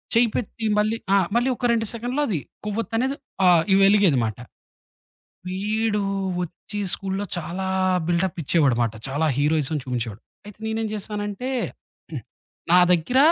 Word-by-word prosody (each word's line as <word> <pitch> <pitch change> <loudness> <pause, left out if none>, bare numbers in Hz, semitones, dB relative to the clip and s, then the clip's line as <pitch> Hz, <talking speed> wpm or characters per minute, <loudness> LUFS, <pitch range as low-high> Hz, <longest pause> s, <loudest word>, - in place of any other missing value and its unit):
చెయ్యిపెట్టి 230 -1 +1
మళ్ళీ 215 +2 +1 0.2
ఆ! - - +6 0.2
మళ్ళీ 240 +2 +3
ఒక 245 - -3
2 225 -1 0
సెకన్లలో 245 +5 -2
అది 185 -8 0 0.3
కొవ్వొత్తనేది 230 +5 -1 0.3
ఆహ్, 175 -3 +6
ఇ - - +6
వెలిగేదనమాట. 165 - +3 1.1
వీడు 210 +3 0 0.4
వచ్చి 180 +4 -7
స్కూల్లో 195 0 -2
చాలా 175 +3 -4 0.4
బిల్టప్ 175 +1 0
ఇచ్చేవాడమాట. 130 -7 +2 0.2
చాలా 145 +4 0
హీరోయిజం 150 0 +1
చూపించేవాడు. 120 -4 -4 0.3
అయితే 210 - -12
నేనేం 220 0 -1
చేశానంటే 205 +3 -4 0.6
హ్మ్. - - -5 0.5
నా 180 - +8
దగ్గర 180 +10 +2
195 Hz, 120 wpm, -23 LUFS, 160-220 Hz, 1.1 s, నా